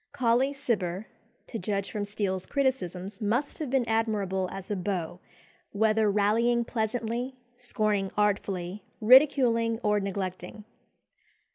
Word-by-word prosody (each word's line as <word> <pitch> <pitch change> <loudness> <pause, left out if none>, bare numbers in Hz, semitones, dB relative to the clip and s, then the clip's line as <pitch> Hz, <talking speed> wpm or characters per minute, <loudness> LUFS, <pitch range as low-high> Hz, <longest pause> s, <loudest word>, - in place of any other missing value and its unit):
Colley 255 0 +2
Cibber, 210 -9 -2 0.4
to 225 - -6
judge 200 +1 -2
from 210 -2 -2
Steele's 195 -3 -2
criticisms, 205 - -2
must 240 +7 -1
have 305 -4 -3
been 255 -2 +1
admirable 205 -5 0
as 195 +1 -7
a - - +1
beau, 180 -3 -3 0.5
whether 215 +1 +3
rallying 230 +4 +2
pleasantly, 235 +3 -2 0.2
scorning 215 -5 0
artfully, 200 -2 -1 0.2
ridiculing, 235 -2 +5
or 210 -1 +3
neglecting. 190 0 -5
215 Hz, 115 wpm, -28 LUFS, 195-235 Hz, 0.5 s, ridiculing